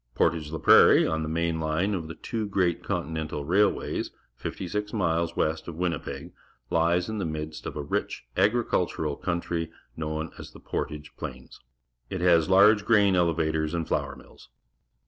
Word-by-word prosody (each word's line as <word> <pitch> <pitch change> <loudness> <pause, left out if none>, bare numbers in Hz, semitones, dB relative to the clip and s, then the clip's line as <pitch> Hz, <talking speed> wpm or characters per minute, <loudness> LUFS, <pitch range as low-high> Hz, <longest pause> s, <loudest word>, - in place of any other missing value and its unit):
^Portage 75 -3 +1
la 80 - -3
Prairie, - - +7
on 80 0 -1
the 80 - -3
main 85 0 0
line 80 +6 0
of 85 -5 -3
the 80 - -7
two 110 +2 -4
great 95 -3 0
continental 80 -1 -3
ra 90 +6 +1
ilw 105 - +3
ays, - - -3 0.3
fifty 90 +8 -5
six 105 +3 -3
miles 85 -5 0
west 80 0 -1
of 85 - -6
Winnipeg, 85 -3 -3 0.4
Ues 85 +2 +2
in 110 -1 -3
the - - -1
midst 75 -1 -5
of - - -6
a 75 - -3
rich 70 - -3
agricultural 95 -7 +1
country 85 -1 -2 0.3
known 80 0 -3
as - - -10
the - - -12
"Portage 75 0 -5
Plains." - - -8 0.5
It 95 - -3
has 85 -2 +4
large 100 +2 +6
grain 105 -3 +4
eleva 85 -3 +2
tors 80 +1 -1
and 85 -2 -2
flour - - -1
mills. - - -17
85 Hz, 175 wpm, -27 LUFS, 80-95 Hz, 0.5 s, Prairie